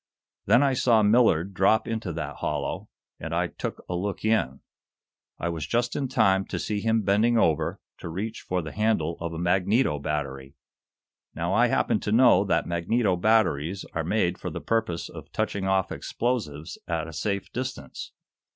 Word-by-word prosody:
Then 115 +7 +5
I 135 -1 +3
saw 115 -3 +3
Millard 105 -5 +3
drop 95 +4 +3
into 110 -5 -3
that 85 - -5
hollow, - - -3 0.3
and - - -4
I - - +1
took - - -6
a 90 - -3
look 100 +4 -3
in. 110 - +1 0.8
I 85 - -3
was 80 -3 -4
just 120 +1 0
in 140 -2 -1
time 100 -6 +3
to - - -4
see 105 -1 -2
him 110 +1 +1
bending 105 +5 +3
over 80 -6 +1 0.2
to 85 - -6
reach 105 +7 -4
for 90 -1 -2
the 80 - -6
handle 105 -7 0
of 85 0 -4
a 80 - -6
magneto 90 - +2
battery. 70 -2 -4 0.8
Now, 85 +3 -1
I 120 +4 +4
happened 110 - +1
to 105 - -2
know 115 -4 +6
that 85 -4 +1
magneto 90 +4 +1
batteries 95 -4 +1
are 80 - -1
made 90 0 0
for - - -4
the - - -5
purpose 110 -7 -1
of - - -11
touching 95 -1 -2
off 95 -1 +1
explosives 90 - -3
at 85 -1 -2
a 80 - -9
safe 100 +2 -3
distance. 125 - -6
95 Hz, 175 wpm, -26 LUFS, 85-110 Hz, 0.8 s, know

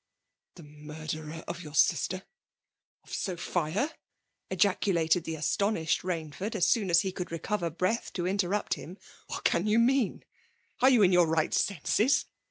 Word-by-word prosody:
" - - -57
The 170 - -12
murderer 155 +2 -7
of 170 +1 -5
your 150 -3 -9
sister, 185 +3 +2 0.4
— - - -62
of - - -13
Sophia 175 - -1
T - - -18 0.6
ejaculated 180 -3 +2
the 160 - -3
astonished 160 +2 0
Bainsford, 180 +4 -4
as 180 -4 +2
soon 215 -6 +2
as 170 0 +5
he 190 - -2
could 180 -1 -6
recover 170 +1 -2
breath 185 +8 -1
to 175 - -2
interrupt 195 +2 0
hinu 180 +5 -10 0.2
'' - - -25
What - - -5
can 175 +5 +2
you 215 +1 +3
mean? 245 -1 +2 0.5
Are 260 - +6
you 245 -5 +5
in 185 - +5
your 175 -2 +5
right 160 -1 +1
senses 220 - +2
180 Hz, 170 wpm, -29 LUFS, 160-205 Hz, 0.6 s, Are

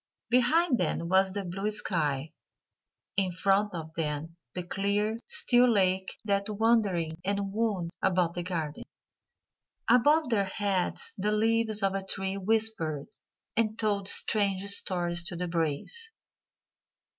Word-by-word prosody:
Behind 255 +4 +3
them 170 - -1
was 190 +1 +3
the 200 +1 -4
blue 195 +4 -3
sky; 155 -8 -1 0.9
in 190 -2 +1
front 195 +3 +1
of 160 -1 -7
them 160 0 -4 0.2
the 180 - -3
clear, 205 +4 -1
still 245 0 +5
lake 190 -3 +1
that 200 0 0
wandered 205 -7 +1
and 200 0 -2
wound 205 -6 -1
about 180 -3 +1
the 175 - -3
garden; 165 -4 -4 1.0
above 290 +5 +4
their 205 -4 +2
heads 195 -2 -2
the 210 +2 0
leaves 220 0 +1
of 195 -1 +2
a 195 0 -2
tree 190 0 -3
whispered 195 -8 -1 0.5
and 220 -1 0
told 205 -3 0
strange 200 -3 +2
stories 175 -3 +1
to 175 +1 -6
the 180 +1 -3
breeze. 170 - -1
195 Hz, 130 wpm, -29 LUFS, 175-215 Hz, 1.0 s, still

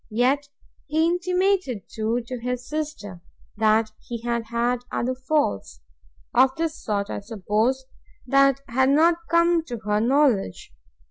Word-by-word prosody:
Yet 265 +6 +1 0.4
he 315 +2 +2
intimated 360 - 0
too, 225 +2 -2
to 250 +1 -6
his 250 +1 -4
sister, 300 - -5 0.3
that 220 0 +2
he 235 -1 -7
had 235 -1 -1
had 235 +2 0
other 255 +2 -1
faults, 255 - -1 0.5
(of 260 +1 +4
this 325 -1 -2
sort, 200 -2 -2
I - - -3
suppose,) 220 +5 -1 0.4
that 275 +1 +3
had 260 +1 +2
not 325 +4 +4
come 335 0 +3
to 240 -5 -5
her 210 0 +1
knowledge! 245 - +1
250 Hz, 135 wpm, -24 LUFS, 220-300 Hz, 0.5 s, of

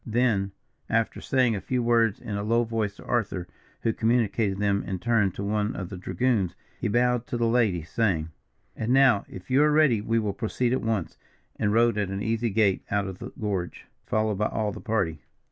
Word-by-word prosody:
Then, 110 -4 +1 0.4
after 115 0 0
saying 125 -4 +2
a 100 - -4
few 125 -1 -1
words 115 -3 +3
in 105 - -5
a 100 - -2
low 115 +3 +2
voice 110 -3 -2
to - - -14
Arthur, 100 -7 -1 0.3
who 115 - +1
communicated 110 -3 +1
them 100 0 +1
in 95 - -3
turn 110 0 +2
to 100 - -5
one 105 +2 -1
of 90 -2 -5
the - - -6
dragoons, 95 +1 0 0.2
he - - -1
bowed 125 +2 +1
to 120 - -2
the 120 - +1
lady, 115 -8 +2
saying: 85 -4 0 0.5
"And 115 +3 -1
now, 130 -6 +5
if 95 +7 -10
you 135 +3 +5
are 150 0 +4
ready, 150 -8 +4
we 115 +2 0
will 105 -3 0
proceed 120 +3 -1
at 130 - 0
once," 110 -6 -2 0.4
and 105 - 0
rode 115 0 +3
at 100 -2 -1
an 95 +1 -3
easy 115 +1 0
gait 100 -2 +2
out 100 0 0
of 95 -1 -7
the - - -6
gorge, 100 -5 -3 0.2
followed 110 -2 0
by 105 - +2
all 105 -2 -1
the - - -8
party. 100 -9 -1
110 Hz, 210 wpm, -26 LUFS, 100-120 Hz, 0.5 s, now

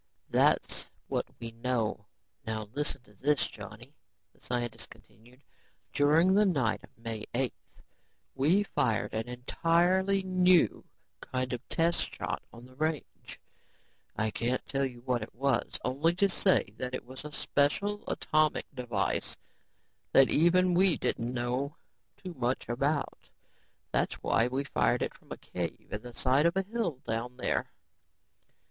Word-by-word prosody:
"That's - - +2 0.2
what - - -1
we 115 -1 -6
know. 115 -3 -2 0.4
Now 110 -1 -3
listen 145 -2 -2
to 105 - -21
this, 145 +8 +2
Johnny," - - -11 0.4
the - - -28
scientist 120 -1 -3
continued. 115 +5 -19 0.5
"During 160 +6 +5
the 205 +2 +5
night 140 - +1
of - - -14
May 115 -2 -5
8th, 130 -1 +1 0.8
we 160 +10 +3
fired 115 - 0
an 110 +2 -2
entirely 175 +10 +2
new 185 -2 +4 0.4
kind 130 0 -3
of 120 - -3
test 165 +1 +1
shot - - -3
on 115 +1 -12
the 130 0 -17
range. 155 0 -3 0.8
I 110 0 0
can't 125 +4 -1
tell 135 0 0
you 120 -2 -11
what 125 -1 0
it - - -8
was, 135 0 0
only 145 +7 +2
to 200 +2 +4
say 190 +1 +2
that 125 0 -3
it - - -6
was 130 +3 -8
a 150 - -7
special 185 +9 0
atomic 155 -1 +1
device 125 -4 -1 0.8
that 135 -1 +7
even 180 +3 +4
we 180 -2 +4
didn't 120 +1 -1
know 125 +4 -2 0.4
too 185 -2 -7
much 125 -3 -1
about. 140 +4 -1 0.6
That's - - +1
why 115 - +2
we 130 +3 -1
fired 60 - +1
it - - -3
from - - -21
a - - -4
cave - - -5
in 105 - -3
the 120 0 -10
side 135 +5 +3
of 170 - 0
a 195 - +2
hill 190 - -2
down 115 +2 -3
there. - - 0
135 Hz, 150 wpm, -30 LUFS, 120-165 Hz, 0.8 s, that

